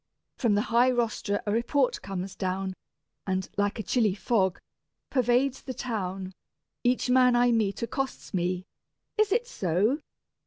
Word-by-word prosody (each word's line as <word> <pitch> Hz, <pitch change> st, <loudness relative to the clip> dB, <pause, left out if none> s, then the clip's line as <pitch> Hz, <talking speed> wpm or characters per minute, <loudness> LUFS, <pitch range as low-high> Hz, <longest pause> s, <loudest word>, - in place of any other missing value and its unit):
From 230 Hz, -6 st, +2 dB
the 205 Hz, -, +3 dB
high 245 Hz, +2 st, +6 dB
rostra 225 Hz, -4 st, 0 dB
a 205 Hz, -, 0 dB
report 245 Hz, +4 st, +1 dB
comes 195 Hz, 0 st, -5 dB
down, 190 Hz, 0 st, -2 dB, 0.5 s
And 190 Hz, -1 st, -1 dB
like 205 Hz, +1 st, 0 dB
a 220 Hz, -, -3 dB
chilly 215 Hz, -2 st, +2 dB
fog, 195 Hz, -4 st, +1 dB, 0.5 s
pervades 255 Hz, +1 st, +2 dB
the 260 Hz, -, -6 dB
town: 190 Hz, -6 st, -3 dB, 0.5 s
Each 250 Hz, +1 st, +2 dB
man 250 Hz, -1 st, +5 dB
I 245 Hz, 0 st, +4 dB
meet 220 Hz, -2 st, +1 dB
accosts 265 Hz, +2 st, -3 dB
me 180 Hz, 0 st, -1 dB, 0.5 s
"Is 430 Hz, -2 st, +4 dB
it 470 Hz, +4 st, +2 dB
so? 205 Hz, -, +1 dB
220 Hz, 145 wpm, -28 LUFS, 190-250 Hz, 0.5 s, high